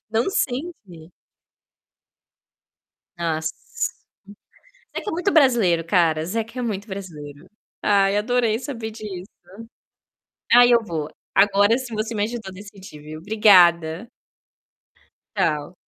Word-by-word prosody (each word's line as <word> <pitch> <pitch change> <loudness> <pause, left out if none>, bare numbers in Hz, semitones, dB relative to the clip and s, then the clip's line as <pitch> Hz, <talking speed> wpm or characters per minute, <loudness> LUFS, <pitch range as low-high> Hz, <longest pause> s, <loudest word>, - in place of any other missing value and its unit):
Não 230 - +1
sente? 245 - -4 2.1
Nossa. 165 - -3 1.0
Zeca 415 - -4
é - - -4
muito 360 +4 0
brasileiro, 235 - +3
cara, 165 -3 +2
Zeca 225 +6 -4
é - - -2
muito 210 -2 -4
brasileiro. 165 -5 -9 0.3
Ai, 200 0 +3
adorei 230 0 +1
saber 230 -6 -6
disso. 205 -3 -8 1.2
Aí 245 0 +7
eu 235 -1 +4
vou, 160 -6 -4 0.2
agora 205 +3 +4
sim 255 -3 -7
você 220 +1 -3
me 205 - 0
ajudou 220 -3 -5
decidir 195 -5 -12
viu, 155 +1 -9
obrigada. 180 -2 +4 1.3
Tchau. 150 +3 -1
205 Hz, 105 wpm, -22 LUFS, 170-235 Hz, 2.1 s, Aí